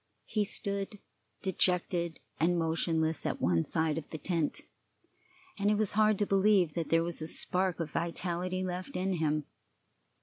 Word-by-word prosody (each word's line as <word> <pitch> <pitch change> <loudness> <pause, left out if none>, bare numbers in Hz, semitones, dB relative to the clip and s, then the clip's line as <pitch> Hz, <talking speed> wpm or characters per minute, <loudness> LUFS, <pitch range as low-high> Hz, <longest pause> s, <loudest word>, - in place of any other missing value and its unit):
He 210 -2 0
stood 200 +1 -2 0.5
dejected 175 -2 +1 0.2
and 175 +2 +3
motionless 160 -1 +1
at - - -2
one 85 -2 +2
side 160 - 0
of 150 - -12
the 155 - -5
tent, 165 -1 -1 1.0
and 200 +1 +2
it 210 - +3
was 215 -2 +2
hard 215 0 +4
to 205 - +1
believe 195 -4 +3
that 165 -1 -3
there 165 0 +4
was 170 -1 -1
a 155 - -2
spark 180 +1 +2
of 160 -3 -3
vitality 180 +2 -2
left 180 0 -5
in 190 +1 0
him. 155 -1 0
175 Hz, 160 wpm, -31 LUFS, 160-190 Hz, 1.0 s, hard